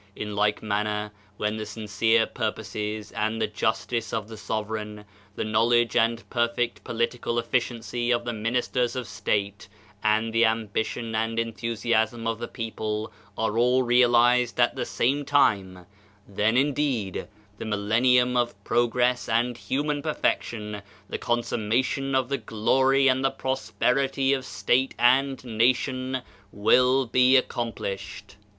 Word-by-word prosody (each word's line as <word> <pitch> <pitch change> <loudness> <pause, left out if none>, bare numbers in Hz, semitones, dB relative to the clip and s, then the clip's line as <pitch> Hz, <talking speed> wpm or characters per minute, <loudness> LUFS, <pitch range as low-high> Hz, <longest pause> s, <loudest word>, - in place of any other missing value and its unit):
In 105 -1 -5
like 105 +1 +1
manner, 105 0 -1 0.3
when 105 +1 -1
the 110 - -4
sincere 110 +1 +1
purposes 110 -1 -4
and 110 +1 -2
the - - +2
justice 115 +2 -2
of 110 -1 -3
the 110 - -8
sovereign, 105 0 -4 0.3
the - - -2
knowledge 115 +2 +2
and 115 +1 +1
perfect 120 0 -1
political 115 +1 -2
efliciency 120 0 -2
of 120 0 +1
the 120 - -2
ministers 120 +3 -1
of 125 -3 -4
state 100 +1 -2 0.4
and 110 +1 +1
the 115 0 +4
ambition 110 +1 -1
and 115 +1 -1
enthusiasm 115 0 -1
of 115 0 -1
the 120 - -4
people 110 -2 -4 0.2
are 110 0 0
all 125 +2 +3
realized 120 0 +4
at - - +3
the - - -2
same 140 +4 0
time, 100 -11 +1 0.4
then 105 +4 +1
indeed, 135 -8 0 0.3
the - - -5
mil 105 -1 -1
lennium 125 +4 +3
of 120 -1 +1
progress 120 +2 +1
and 120 +2 +1
human 145 +4 -2
perfection, 105 -8 -2 0.3
the - - -4
consummation 120 +4 -1
of 130 -2 +2
the 140 +1 -2
glory 130 +5 +2
and 130 0 +2
the 135 - +3
prosperity 135 +1 0
of 135 -1 -2
state 120 +6 0
and 130 +2 +3
nation 130 +2 0 0.3
will 125 +5 +3
be 130 +2 +5
accomplished. 100 -5 -4
115 Hz, 135 wpm, -25 LUFS, 110-125 Hz, 0.4 s, be